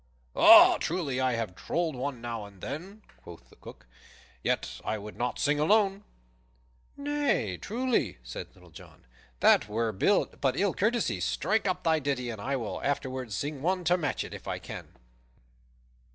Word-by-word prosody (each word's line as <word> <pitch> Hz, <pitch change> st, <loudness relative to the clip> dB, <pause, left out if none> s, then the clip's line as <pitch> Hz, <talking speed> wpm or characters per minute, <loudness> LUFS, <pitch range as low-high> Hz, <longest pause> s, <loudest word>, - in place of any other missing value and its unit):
"Truly, 155 Hz, -7 st, -2 dB
I 130 Hz, -1 st, +2 dB
have 115 Hz, -5 st, -3 dB
trolled 165 Hz, -, -2 dB
one 125 Hz, -1 st, -4 dB
now 115 Hz, -3 st, -5 dB
and 100 Hz, -2 st, -15 dB
then," 185 Hz, -, -7 dB, 0.2 s
quoth 85 Hz, -1 st, -13 dB
the -, -, -18 dB
Cook, -, -, -13 dB, 0.6 s
"yet -, -, -2 dB
I 110 Hz, -, -2 dB
would 105 Hz, +1 st, -9 dB
not 125 Hz, 0 st, -2 dB
sing 145 Hz, 0 st, +1 dB
alone." 200 Hz, +4 st, +3 dB, 0.9 s
"Nay, 285 Hz, -, 0 dB
truly," 230 Hz, -, -1 dB
said -, -, -7 dB
Little -, -, -18 dB
John, -, -, -15 dB, 0.4 s
"that 110 Hz, -, +5 dB
were 115 Hz, +1 st, 0 dB
but 135 Hz, -, +1 dB
ill 200 Hz, -2 st, +2 dB
courtesy. 225 Hz, -, 0 dB
Strike 200 Hz, -, 0 dB
up 185 Hz, -1 st, -1 dB
thy 160 Hz, -1 st, +3 dB
ditty, 135 Hz, -4 st, -2 dB
and 110 Hz, -3 st, -8 dB
I 135 Hz, +5 st, -1 dB
will 115 Hz, -5 st, -4 dB
afterward 130 Hz, -4 st, -2 dB
sing 140 Hz, +7 st, -4 dB
one 180 Hz, +3 st, 0 dB
to 175 Hz, +1 st, +3 dB
match 155 Hz, -6 st, -2 dB
it, -, -, -9 dB
if -, -, -10 dB
I -, -, -2 dB
can. -, -, -8 dB
140 Hz, 160 wpm, -28 LUFS, 115-185 Hz, 0.9 s, that